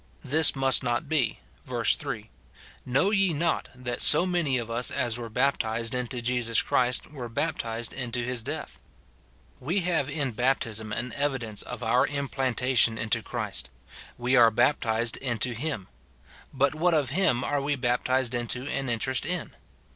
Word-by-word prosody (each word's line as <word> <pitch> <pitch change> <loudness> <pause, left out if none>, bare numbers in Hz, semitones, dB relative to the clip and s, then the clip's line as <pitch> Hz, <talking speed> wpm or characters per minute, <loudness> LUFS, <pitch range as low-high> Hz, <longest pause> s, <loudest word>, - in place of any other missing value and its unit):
This 155 +3 +4
must 135 -1 +4
not 120 +3 -1
be: 145 - 0 0.2
verse - - +2
3, - - -5 0.3
" - - -22
Know 135 +11 +2
ye 195 -4 +3
not, 165 +3 -1
that 125 -1 -5
so 175 - +7
many 170 -8 +1
of 115 -2 -4
us 120 +2 +2
as 120 -2 -1
were 120 -1 -6
baptized 115 -2 0
into 125 -1 -3
Jesus 120 -2 +1
Christ 125 +3 +1
were 125 -5 -7
baptized 115 -4 -2
into 125 -2 -3
his 125 -1 -2
death - - -6 0.4
?" 65 -1 -33
We 190 +3 +2
have 170 -6 0
in 140 -5 -1
baptism 115 -3 -1
an 120 +3 -4
evidence 130 -7 -2
of 125 0 -7
our 120 +2 +3
implantation 130 -4 +1
into 110 -1 0
Christ; 65 - -4 0.5
we 125 +2 +1
are 120 -2 +7
baptized 115 -1 +1
into 120 -2 -1
him: 120 -5 -4 0.6
but 140 +1 +1
what 165 +2 +2
of 145 -6 0
him 155 -11 +2
are 145 -1 0
we 145 +1 0
baptized 125 0 0
into 120 +1 -2
an 140 -2 -2
interest 120 +2 0
in 175 +1 -1
125 Hz, 160 wpm, -27 LUFS, 115-140 Hz, 0.6 s, so